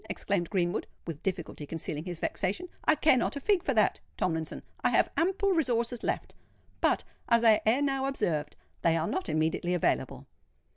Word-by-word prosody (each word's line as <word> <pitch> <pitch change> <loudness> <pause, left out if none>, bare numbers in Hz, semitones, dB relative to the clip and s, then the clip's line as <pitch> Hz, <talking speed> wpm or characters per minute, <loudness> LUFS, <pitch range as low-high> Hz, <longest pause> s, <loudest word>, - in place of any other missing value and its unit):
exclaimed 190 -4 -1
Greenwood, 175 -4 0 0.2
with 165 -2 -6
difficulty 175 -5 -3
concealing 155 -1 -4
his 175 -3 -5
vexation. 280 - -1 0.2
"I 310 - +5
care 300 -3 +4
not 245 - 0
a - - -3
fig 390 +4 +2
for 270 - -1
that, 215 -2 +3 0.2
Tomlinson. 160 -2 -2 0.2
I - - +4
have - - +3
ample 390 +3 +2
resources 245 -8 +1
left; - - -2 0.5
but, - - +2 0.3
as 235 0 +4
I 220 -2 +6
ere 250 +6 +4
now 270 -1 0
observed, 160 - -1 0.3
they 165 -1 +3
are 160 - 0
not 375 - -2
immediately 160 +3 0
available." 175 - 0
215 Hz, 175 wpm, -29 LUFS, 165-275 Hz, 0.5 s, I